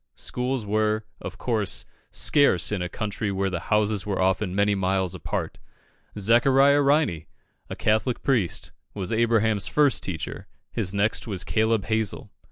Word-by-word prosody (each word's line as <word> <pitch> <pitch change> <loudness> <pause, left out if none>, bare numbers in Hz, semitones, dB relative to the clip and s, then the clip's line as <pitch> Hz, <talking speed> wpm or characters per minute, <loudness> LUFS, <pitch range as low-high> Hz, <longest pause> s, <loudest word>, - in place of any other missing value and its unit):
Schools 125 -2 -2
were, 110 +1 0 0.2
of - - -7
course, 110 -6 -1 0.2
scarce 140 - +2
in 100 -3 -1
a 90 - -3
country 105 0 -3
where 95 0 -1
the 85 - -2
houses 105 -1 +2
are 100 - -2
often 95 0 0
many 100 +1 +2
miles 95 -1 0
apart. 90 - -4 0.6
Zachariah 135 +7 +4
Riney, 140 - +1 0.4
a - - -5
Catholic 110 +3 0
priest, 115 -11 0 0.2
was 95 0 -3
Abraham's 110 -3 +2
first 145 +3 +2
teacher; 85 -5 -5 0.2
his 100 -6 -1
next 100 +4 +1
was 95 -4 -1
Caleb 110 -1 +1
Hazel. 110 -2 -2
105 Hz, 145 wpm, -25 LUFS, 95-115 Hz, 0.6 s, Zachariah